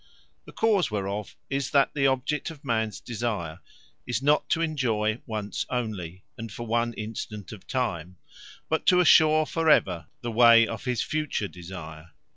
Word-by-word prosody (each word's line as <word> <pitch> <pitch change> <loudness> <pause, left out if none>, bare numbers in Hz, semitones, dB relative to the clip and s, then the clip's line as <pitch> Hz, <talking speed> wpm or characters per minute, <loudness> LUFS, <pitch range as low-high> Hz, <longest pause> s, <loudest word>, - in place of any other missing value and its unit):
The - - -12
cause 215 -5 +2
whereof 100 0 -4
is, 140 -1 -2
That 140 -1 +3
the 140 -2 +2
object 135 +4 -1
of 150 -3 -12
mans 110 -6 -1
desire, 105 -7 -4 0.5
is 120 -2 0
not 145 +3 +2
to 165 - +1
enjoy 120 -8 0
once 105 -3 -3
onely, 100 -8 -4 0.2
and 115 -1 -6
for 120 +2 -6
one 120 +1 0
instant 105 -2 -6
of 110 -4 -11
time; 90 -9 -3 0.5
but 160 - -1
to 180 - +6
assure 155 -2 +6
for 165 +1 0
ever, 90 - +3
the 120 - -4
way 115 0 +7
of 115 +2 -6
his 125 -3 0
future 150 -9 -2
desire. 85 -3 -10
115 Hz, 160 wpm, -26 LUFS, 100-140 Hz, 0.5 s, way